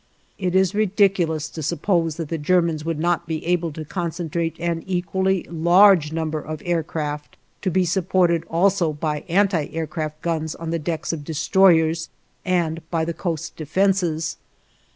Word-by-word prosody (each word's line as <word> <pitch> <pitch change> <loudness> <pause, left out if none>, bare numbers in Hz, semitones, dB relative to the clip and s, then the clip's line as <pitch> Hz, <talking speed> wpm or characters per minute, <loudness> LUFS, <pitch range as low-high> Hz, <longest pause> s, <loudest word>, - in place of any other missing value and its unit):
It 185 -1 -1
is 190 0 +3
ridiculous 190 -6 +2
to 160 - -7
suppose 165 +1 0
that 165 -3 -5
the 165 - -2
Germans 165 0 +1
would 165 -1 -2
not 170 +1 0
be 160 -1 -4
able 175 -1 0
to 155 +1 -7
concentrate 170 -1 -3
an 170 -1 -1
equally 190 +1 0
large 175 0 +5
number 160 -1 -2
of 155 0 -6
aircraft, 155 -3 -3 0.2
to 190 - 0
be 185 +1 +2
supported 175 -1 +2
also 175 -1 +2
by 150 0 -3
anti 185 -4 +2
aircraft 155 -1 -4
guns 160 -2 -2
on 165 -1 -5
the 165 - -1
decks 165 +1 -3
of 155 -3 -5
destroyers 160 0 +3 0.3
and 170 -3 0
by 165 -2 0
the 170 - -2
coast 165 -3 -4
defenses. 165 -1 0
165 Hz, 155 wpm, -22 LUFS, 160-180 Hz, 0.3 s, large